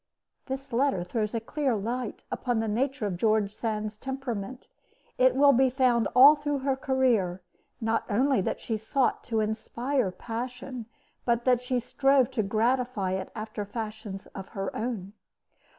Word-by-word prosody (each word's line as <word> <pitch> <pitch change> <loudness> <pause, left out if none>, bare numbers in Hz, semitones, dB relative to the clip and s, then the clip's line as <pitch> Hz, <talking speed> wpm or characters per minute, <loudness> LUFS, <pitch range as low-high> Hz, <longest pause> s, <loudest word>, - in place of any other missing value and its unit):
This 265 -1 -5
letter 255 -7 +2
throws 210 +5 -2
a - - +1
clear 270 +2 -1
light 230 +3 -3
upon 245 -3 -1
the 225 - -1
nature 260 +3 -1
of 190 -4 -2
George 215 0 +2
Sand's 215 -1 -3
temperament. 260 -2 -5 0.5
It 255 0 +5
will 280 +1 +6
be 260 +1 +4
found 245 -3 +2
all 270 +4 +10
through 290 -1 -2
her 270 -1 +2
career, 245 -10 +1 0.4
not 225 -1 0
only 255 +2 +3
that - - -2
she 225 - -2
sought 240 +4 0
to 225 -2 0
inspire 235 +3 -1
passion, 245 +4 -6 0.4
but 235 0 +1
that 250 -2 +4
she 250 0 0
strove 265 +1 +2
to 250 -4 0
gratify 225 -1 0
it 190 0 -3
after 215 -1 -4
fashions 215 -2 -6
of 195 -1 -7
her 195 0 -3
own. 215 -4 -3
235 Hz, 155 wpm, -28 LUFS, 215-260 Hz, 0.5 s, all